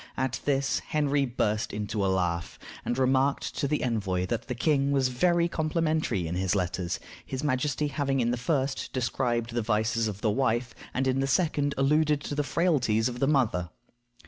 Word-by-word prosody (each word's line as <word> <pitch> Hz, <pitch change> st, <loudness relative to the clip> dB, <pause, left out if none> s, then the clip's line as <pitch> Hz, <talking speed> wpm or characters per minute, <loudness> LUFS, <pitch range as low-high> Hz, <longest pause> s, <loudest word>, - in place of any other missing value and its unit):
At 130 Hz, -1 st, -1 dB
this 140 Hz, -1 st, +1 dB
Henry 145 Hz, -2 st, 0 dB
burst 110 Hz, -3 st, -1 dB
into 105 Hz, 0 st, -2 dB
a -, -, +2 dB
laugh, 90 Hz, -2 st, -1 dB, 0.3 s
and 120 Hz, -, -2 dB
remarked 135 Hz, +1 st, +1 dB
to 140 Hz, -, 0 dB
the 150 Hz, +1 st, 0 dB
envoy 100 Hz, -7 st, 0 dB
that 115 Hz, +3 st, -3 dB
the 125 Hz, -, -3 dB
king 140 Hz, +1 st, +2 dB
was 135 Hz, -2 st, +2 dB
very 170 Hz, +7 st, +2 dB
complimentary 155 Hz, -, 0 dB
in 80 Hz, -, -3 dB
his 95 Hz, +1 st, 0 dB
letters, 90 Hz, -1 st, -1 dB, 0.2 s
his 130 Hz, +1 st, -5 dB
majesty 145 Hz, +1 st, 0 dB
having 140 Hz, -2 st, 0 dB
in 120 Hz, -1 st, +2 dB
the -, -, +1 dB
first 135 Hz, +1 st, -1 dB
described 120 Hz, -2 st, -1 dB
the 120 Hz, -, 0 dB
vices 110 Hz, +1 st, +1 dB
of 105 Hz, -1 st, -5 dB
the 110 Hz, -, +2 dB
wife, 120 Hz, -1 st, 0 dB, 0.2 s
and 130 Hz, -, -1 dB
in 130 Hz, 0 st, +1 dB
the 135 Hz, -, +1 dB
second 145 Hz, -1 st, +1 dB
alluded 150 Hz, +2 st, +3 dB
to 145 Hz, -, -5 dB
the 145 Hz, -, +1 dB
frailties 135 Hz, -9 st, +2 dB
of 125 Hz, 0 st, -6 dB
the 135 Hz, -, +2 dB
mother. 115 Hz, -, +1 dB
130 Hz, 185 wpm, -28 LUFS, 110-145 Hz, 0.3 s, alluded